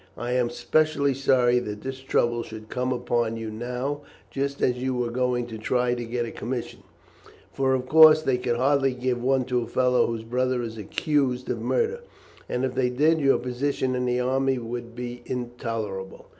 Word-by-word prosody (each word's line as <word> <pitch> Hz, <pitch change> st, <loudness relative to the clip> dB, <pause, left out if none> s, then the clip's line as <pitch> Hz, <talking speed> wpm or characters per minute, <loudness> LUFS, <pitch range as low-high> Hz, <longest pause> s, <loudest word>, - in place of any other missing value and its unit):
I 120 Hz, +2 st, -3 dB
am 125 Hz, -1 st, +1 dB
specially 140 Hz, +2 st, +1 dB
sorry 125 Hz, -2 st, +3 dB
that 105 Hz, -3 st, -6 dB
this 130 Hz, 0 st, -5 dB
trouble 120 Hz, -3 st, +1 dB
should 110 Hz, -1 st, -9 dB
come 125 Hz, +1 st, -1 dB
upon 120 Hz, -2 st, 0 dB
you 110 Hz, -1 st, -5 dB
now, 125 Hz, +6 st, -3 dB, 0.3 s
just 140 Hz, +1 st, -2 dB
as 125 Hz, -1 st, +2 dB
you 130 Hz, 0 st, -1 dB
were 120 Hz, -1 st, -1 dB
going 125 Hz, 0 st, 0 dB
to 115 Hz, -2 st, -8 dB
try 125 Hz, +2 st, +1 dB
to 120 Hz, -1 st, -3 dB
get 120 Hz, +1 st, -2 dB
a 115 Hz, -, -6 dB
commission, 120 Hz, +2 st, -5 dB, 0.7 s
for 130 Hz, -1 st, +2 dB
of 130 Hz, -1 st, -2 dB
course 155 Hz, 0 st, +8 dB
they 130 Hz, -4 st, +1 dB
could 125 Hz, -1 st, 0 dB
hardly 135 Hz, 0 st, +2 dB
give 125 Hz, -1 st, -1 dB
one 130 Hz, 0 st, +2 dB
to 125 Hz, -1 st, 0 dB
a 115 Hz, -, -5 dB
fellow 125 Hz, 0 st, +2 dB
whose 115 Hz, -1 st, -4 dB
brother 125 Hz, +1 st, 0 dB
is 115 Hz, -1 st, -6 dB
accused 130 Hz, +3 st, 0 dB
of -, -, -3 dB
murder, 465 Hz, -1 st, 0 dB, 0.5 s
and 125 Hz, +1 st, 0 dB
if 130 Hz, -, -3 dB
they 125 Hz, -1 st, +1 dB
did, 155 Hz, +6 st, +3 dB
your 135 Hz, -1 st, +4 dB
position 130 Hz, +1 st, -1 dB
in 125 Hz, 0 st, -1 dB
the 125 Hz, 0 st, +1 dB
army 130 Hz, +1 st, +1 dB
would 120 Hz, 0 st, -6 dB
be 120 Hz, 0 st, -6 dB
intolerable. 115 Hz, -6 st, -4 dB
125 Hz, 190 wpm, -25 LUFS, 120-130 Hz, 0.7 s, course